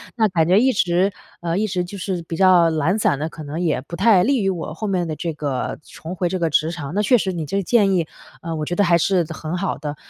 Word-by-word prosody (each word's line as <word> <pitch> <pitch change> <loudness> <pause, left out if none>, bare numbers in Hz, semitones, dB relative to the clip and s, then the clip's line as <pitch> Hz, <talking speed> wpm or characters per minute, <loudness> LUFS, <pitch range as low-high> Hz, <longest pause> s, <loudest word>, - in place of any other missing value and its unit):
那 225 -3 +3
感 165 -4 +1
觉 185 +4 +5
一 260 +3 +4
直 185 -2 +1 0.3
呃， 170 0 -1
一 215 +2 0
直 180 -2 -1
就 180 +3 -8
是 185 -2 -3
比 165 - -4
较 180 -3 +5
懒 160 +5 +1
散 140 - +1
的， 155 - -2
可 155 -1 -10
能 150 +3 -5
也 165 -4 +1
不 170 - -8
太 190 0 +4
利 260 +1 +2
于 195 - +1
我 165 -4 -4
后 210 +6 -4
面 180 -3 0
的 155 - -3
这 165 +1 -4
个 145 -4 -3
重 165 +3 -8
回 180 -1 0
这 185 - -2
个 165 -2 +1
职 155 +2 +1
场， 155 -3 -6
那 205 - +2
确 245 +4 +4
实 190 -4 -1
你 165 -3 -4
这 175 +7 -2
个 200 - 0
建 205 0 +3
议， 170 -3 +1 0.3
呃， 165 0 -4
我 155 -1 -3
觉 175 - -3
得 205 - +3
还 170 -2 +4
是 180 +1 +2
的 160 - -7
很 160 +3 -4
好 195 +1 -2
的。 145 0 -5
175 Hz, 310 characters per minute, -21 LUFS, 160-195 Hz, 0.3 s, 觉